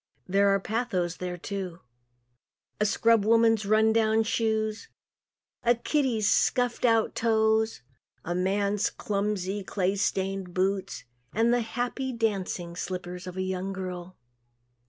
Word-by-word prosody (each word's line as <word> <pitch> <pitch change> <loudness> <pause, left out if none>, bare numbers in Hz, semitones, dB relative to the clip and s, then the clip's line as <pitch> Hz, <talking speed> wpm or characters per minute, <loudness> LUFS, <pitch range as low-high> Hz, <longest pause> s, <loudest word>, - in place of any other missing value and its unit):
There 200 +1 +3
is 195 - -1
pathos 195 -7 -1
there, 180 -1 -4
too. 185 -1 -5 1.0
A 210 - +3
scrub 230 0 +3
woman's 225 -1 +3
run 220 +1 +4
down 220 0 +3
shoes, 220 -1 -1 0.7
a 240 0 +3
kiddie's 235 -4 0
scuffed 245 +2 +2
out 225 -2 +3
toes, 220 - +1 0.4
a 175 - -1
man's 200 +3 +1
clumsy, 200 -1 -2
clay 190 0 -1
stained 195 -2 -2
boots 190 -7 -1 0.3
and 230 +2 +3
the 245 - +2
happy 245 +3 -3
dancing 195 -6 -2
slippers 180 0 -5
of 180 0 -7
a 185 - -1
young 190 +1 -3
girl. 185 -1 -6
205 Hz, 125 wpm, -27 LUFS, 185-225 Hz, 1.0 s, run